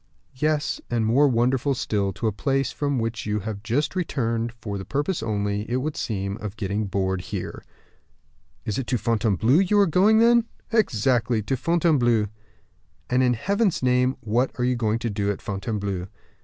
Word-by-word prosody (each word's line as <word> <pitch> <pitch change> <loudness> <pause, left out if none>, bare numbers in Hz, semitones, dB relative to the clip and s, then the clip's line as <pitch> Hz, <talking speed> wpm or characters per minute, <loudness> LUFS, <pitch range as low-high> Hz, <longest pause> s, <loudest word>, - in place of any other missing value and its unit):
"Yes; 150 +1 0
and 115 -2 0
more 130 +7 +4
wonderful 130 +2 +1
still, 100 -5 -1
to 115 - -5
a 110 - +2
place 135 +5 0
from 145 -2 -1
which 115 -1 -3
you 105 0 -1
have 105 0 -5
just 130 - -1
returned 115 -9 -1
for 110 -4 -6
the - - -5
purpose 145 - -2
only, 105 -1 -2
it 120 - 0
would 145 +4 -2
seem, 100 -5 -3
of 105 -1 -7
getting 100 0 -2
bored 95 -1 -1
here." - - -6 1.0
"It 105 0 -2
is - - -1
to 125 +1 -1
Fontainebleau 110 - +2
you 195 +2 +2
are 200 - +6
going, 195 +6 +4
then?" 235 0 +5 0.3
"Exactly; 120 - +2
to 135 - -1
Fontainebleau." 130 - +2 0.8
"And, 125 +1 +3
in 125 -1 +3
Heaven's 200 - 0
name, 125 +1 +2
what 120 +4 +1
are 125 - -1
you 125 0 +2
going 110 -2 0
to 115 0 -3
do 100 0 -1
at 100 - -2
Fontainebleau?" 100 -2 -3
120 Hz, 175 wpm, -24 LUFS, 105-140 Hz, 1.0 s, are